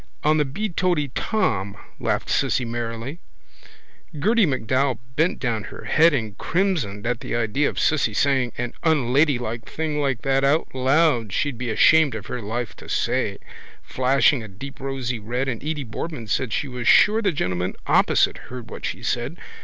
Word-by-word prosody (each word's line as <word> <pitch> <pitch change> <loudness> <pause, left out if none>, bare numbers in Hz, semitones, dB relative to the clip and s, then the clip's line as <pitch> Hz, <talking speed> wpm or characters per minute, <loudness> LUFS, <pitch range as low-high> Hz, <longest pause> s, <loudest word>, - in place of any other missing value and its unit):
—On 155 +1 +3
the 150 - +2
beeoteetom, 155 - -1 0.2
laughed - - -1
Cissy 125 - +1
merrily. 115 +5 -4 1.0
Gerty 215 +5 +3
MacDowell 130 -1 0 0.2
bent 160 +5 +2
down 115 -5 -2
her - - -10
head 165 +2 +4
and 110 -8 -2
crimsoned 160 - -1
at 120 0 -1
the - - -4
idea 120 +5 +1
of - - -9
Cissy 135 -9 +1
saying 130 -2 +2
an 120 0 -3
unladylike 130 -6 +1
thing 155 -2 -2
like 135 -4 -1
that 135 -1 +2
out 145 +4 +1
loud 130 -3 +2
she'd 135 +3 -1
be 125 -1 -3
ashamed 155 +4 +5
of 105 -4 -6
her 125 - -5
life 110 -1 -4
to - - -12
say, - - 0 0.5
flushing 130 +1 +2
a 110 - -8
deep 120 +8 -10
rosy 130 -3 -3
red, 120 +5 -2
and 120 -3 -3
Edy 150 -1 -2
Boardman 125 +2 -6
said 110 +3 -1
she 140 - -1
was 125 -2 -5
sure 215 +2 +6
the 200 -4 +2
gentleman 90 - -2
opposite - - +3
heard 125 -2 -8
what - - -8
she - - -4
said. - - -2
130 Hz, 165 wpm, -23 LUFS, 115-150 Hz, 1.0 s, sure